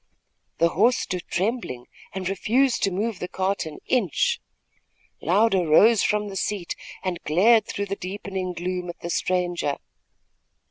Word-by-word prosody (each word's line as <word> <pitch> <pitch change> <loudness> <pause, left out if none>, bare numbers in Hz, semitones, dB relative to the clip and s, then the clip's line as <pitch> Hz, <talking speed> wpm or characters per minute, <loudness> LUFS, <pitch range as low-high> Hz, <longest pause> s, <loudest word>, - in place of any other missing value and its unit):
The 170 - +4
horse 225 +9 +3
stood 180 -2 -4
trembling 190 - -2 0.3
and 190 -2 -4
refused 235 +7 +1
to 195 - +2
move 205 +2 -2
the 180 - -3
cart 190 -1 -1
an 155 - -8
inch. 220 - +1 0.8
Louder 190 0 +3
rose 210 +8 +6
from 210 0 +1
the 195 - -7
seat 195 -2 -2 0.3
and 180 -3 -2
glared 210 +8 +4
through 200 - -3
the 200 0 -3
deepening 190 -1 -4
gloom 180 +1 -3
at 175 - -8
the 170 - -4
stranger. 175 -6 0
190 Hz, 145 wpm, -24 LUFS, 175-210 Hz, 0.8 s, rose